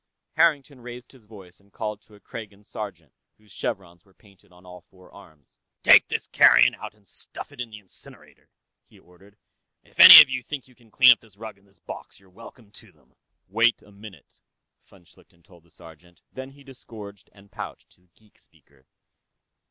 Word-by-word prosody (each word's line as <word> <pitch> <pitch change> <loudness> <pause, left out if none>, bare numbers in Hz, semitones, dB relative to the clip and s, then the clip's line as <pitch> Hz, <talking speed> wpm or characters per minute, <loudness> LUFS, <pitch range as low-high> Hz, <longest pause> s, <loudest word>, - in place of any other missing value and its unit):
Harrington 145 -5 -1
raised 125 0 -12
his 130 -5 -22
voice 95 -5 -17
and 100 0 -31
called 105 -1 -7
to 110 - -23
a - - -20
Kragan 105 -1 -12
sergeant 95 -8 -10 0.2
whose 105 -1 -26
chevrons 85 -3 -8
were 95 -2 -30
painted 100 -4 -26
on 90 +1 -22
all 90 -1 -14
four 90 +1 -23
arms. 80 -9 -21 0.2
"Take - - +6
this - - -5
carrion - - +4
out - - -11
and 105 -2 -31
stuff - - -6
it - - -10
in 120 - -7
the 110 - -12
incinerator," 100 -3 -20 0.4
he - - -23
ordered. 95 +4 -24 0.5
"If - - -26
any - - +12
of - - +7
you 130 -1 -5
think 135 +1 -9
you 130 - -24
can 120 -2 -27
clean 125 +3 +5
up 120 - +2
this 110 -4 -24
rug 110 -2 -12
and 100 - -31
this 100 - -31
box, - - -13
you're 95 -1 -26
welcome 115 +1 -17
to 110 -1 -16
them." 70 -5 -34 0.3
"Wait 115 +4 0
a 105 - -21
moment," 100 -6 -17 0.4
von 95 -3 -24
Schlichten 85 0 -26
told 85 0 -22
the 85 - -30
sergeant. 85 +1 -19
Then 130 0 -10
he 140 +1 -20
disgorged 110 -7 -15
and 100 -1 -23
pouched - - -11
his 90 0 -34
geek 105 +4 -31
speaker. 70 -2 -30
100 Hz, 195 wpm, -22 LUFS, 90-115 Hz, 0.5 s, any